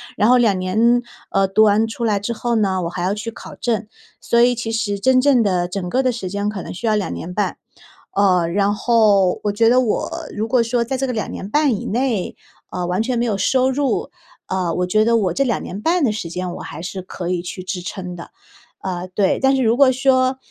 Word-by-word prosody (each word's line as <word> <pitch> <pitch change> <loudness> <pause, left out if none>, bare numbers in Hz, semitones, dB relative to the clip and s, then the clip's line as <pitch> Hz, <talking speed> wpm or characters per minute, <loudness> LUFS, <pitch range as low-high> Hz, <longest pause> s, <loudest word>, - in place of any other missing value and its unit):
然 210 +3 +3
后 250 - +6
2 210 -6 +2
年， 230 +6 +2 0.3
呃， 195 0 +2
读 205 +3 +4
完 215 +1 +3
出 235 +1 -6
来 205 -2 +1
之 235 +4 -3
后 240 +1 -2
呢， 190 -4 +1
我 170 - -2
还 175 0 -5
要 195 +3 0
去 215 +2 -5
考 - - -11
证。 220 -3 -2 0.3
所 235 - +1
以 245 +1 +5
其 230 -1 -4
实 205 -3 -1
真 255 +4 +4
正 265 -3 +4
的 180 -4 +1
整 180 -1 -4
个 260 +5 +1
的 255 - +2
时 195 -6 -5
间 205 +1 -2
可 210 -3 -3
能 - - -7
需 210 - -6
要 220 - +2
2 205 - -1
年 180 +2 -6
半， 205 - -1 0.5
呃， 185 -4 +2
然 200 +4 +1
后 205 -6 +3
我 205 - +2
觉 225 +2 +3
得 255 +1 +5
我 230 - -1 0.2
如 215 +2 -2
果 245 +1 +3
说 235 +1 0
在 265 +3 -3
这 270 +1 -1
个 250 - -2
2 215 - -3
年 195 - -6
半 290 -3 +2
以 - - -6
内， 235 -3 -1 0.4
嗯， 180 -1 -3
完 180 +4 0
全 245 +1 -1
没 235 - +1
有 215 - 0
收 260 +5 +2
入， 280 0 -1 0.4
呃， 180 -3 -1
我 180 - 0
觉 215 +4 +2
得 230 +1 +3
我 185 -6 0
这 275 - +1
2 235 -5 -1
年 200 +3 -6
半 340 +3 +1
的 245 - +3
时 210 -5 -5
间 180 +1 -4
我 - - -8
还 - - -8
是 185 +1 -5
可 180 -1 -6
以 180 -1 -1
去 180 +1 -7
支 180 -1 -4
撑 180 -1 -6
的。 170 - -10 0.6
呃， 180 -1 -3
对， 200 -2 +2
但 270 0 +4
是 260 - +1
如 230 +2 +2
果 275 -2 +6
说 260 0 +2
215 Hz, 250 characters per minute, -20 LUFS, 190-240 Hz, 0.6 s, 后